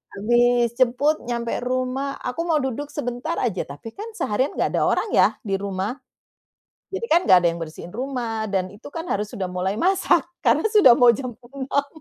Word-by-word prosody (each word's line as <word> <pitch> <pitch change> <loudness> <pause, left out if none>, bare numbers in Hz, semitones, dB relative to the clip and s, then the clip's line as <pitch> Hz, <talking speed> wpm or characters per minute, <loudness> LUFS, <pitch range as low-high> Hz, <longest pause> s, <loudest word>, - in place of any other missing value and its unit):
Habis 240 +3 +3
jemput 260 +5 +3
nyampe 235 -1 -2
rumah, 255 +2 -2
aku 250 +6 -3
mau 330 - +2
duduk 265 +2 -3
sebentar 275 +3 -4
aja, 200 -7 -1
tapi 145 +11 -9
kan 415 - -8
seharian 260 - -1
nggak - - 0
ada - - +1
orang - - +1
ya - - +6 0.2
di 200 -4 -3
rumah. 200 +5 -3 0.9
Jadi 390 +4 -4
kan 340 - +6
nggak 190 - +9
ada 175 - +1
yang 170 - -7
bersihin 165 +2 -8
rumah 235 -4 -3
dan 185 -1 -1
itu 205 +3 -12
kan 325 +3 -6
harus 210 +1 -2
sudah 200 -4 -4
mulai 185 +2 -1
masak 350 - +3 0.2
karena - - +2
sudah 405 - +8
mau 245 -1 +7
jam 255 +2 -4 0.2
6:00. 280 +1 -1
245 Hz, 185 wpm, -23 LUFS, 205-275 Hz, 0.9 s, nggak